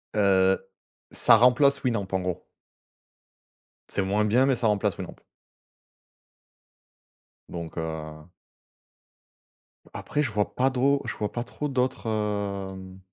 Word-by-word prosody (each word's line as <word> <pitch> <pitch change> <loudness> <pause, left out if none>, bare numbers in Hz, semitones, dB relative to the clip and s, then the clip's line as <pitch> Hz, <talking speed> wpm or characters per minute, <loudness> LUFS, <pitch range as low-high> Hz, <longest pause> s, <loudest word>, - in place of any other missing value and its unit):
Heu, 95 -2 +4 0.5
ça - - +5
remplace 135 +4 +4
Winamp, 115 -6 -1
en 95 - +1
gros. 90 0 -4 1.4
C'est 100 - -1
moins 100 +3 +1
bien, 125 +5 +3
mais 135 -2 +2
ça 120 -2 0
remplace 105 -2 0
Winamp. - - -7 2.3
Donc 85 -1 -7
heu 80 -1 -5 1.7
Après, 150 - -2
je 120 - -2
vois 105 -1 -1
pas 130 +1 +3
do 135 +2 +2
je - - -3
vois 105 - -2
pas 120 - -3
trop 150 +4 -5
d'autres, 130 -3 -1
hem 100 -3 -3
105 Hz, 120 wpm, -26 LUFS, 95-125 Hz, 2.3 s, ça